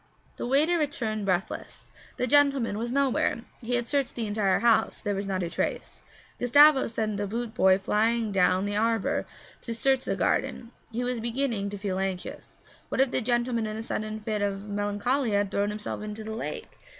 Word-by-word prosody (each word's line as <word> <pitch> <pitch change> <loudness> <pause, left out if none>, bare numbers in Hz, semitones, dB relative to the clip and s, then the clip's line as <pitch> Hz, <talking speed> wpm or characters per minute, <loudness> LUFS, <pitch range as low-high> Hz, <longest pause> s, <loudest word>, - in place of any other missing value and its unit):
The - - -3
waiter 305 +7 +3
returned 225 -8 -2
breathless. 185 0 -2 0.3
The - - 0
gentleman 275 -5 +3
was 235 +1 -3
nowhere. 270 -3 +1 0.2
He 245 +1 -1
had 240 -1 -1
searched 280 -3 0
the 230 - -2
entire 205 -2 +1
house; 235 -1 +2
there 205 - -2
was 195 0 -3
not 190 -2 -1
a 170 - -2
trace. - - -3 0.4
Gustavo 285 +3 +6
sent 220 -2 -2
the 205 0 -2
boot 230 +2 -4
boy 190 -4 +5
flying 220 +3 +1
down 185 0 +3
the 205 0 -2
arbour 225 -1 +1 0.3
to 230 - -5
search 265 +2 +1
the - - -1
garden; 235 -1 -1 0.2
he 235 +2 -2
was 250 -1 -1
beginning 230 -3 -1
to 205 - -6
feel 195 -2 -2
anxious. 190 -2 -5 0.3
What - - -2
if 265 -1 +3
the - - 0
gentleman 240 -1 0
in 215 0 -4
a 220 - -4
sudden 215 -1 -3
fit 215 -1 -2
of 200 0 -2
melancholia 205 +4 0
had 200 -1 0
thrown 200 0 +1
himself 210 0 -5
into 215 +1 -6
the 220 0 -5
lake? 230 - -6
220 Hz, 190 wpm, -27 LUFS, 205-245 Hz, 0.4 s, Gustavo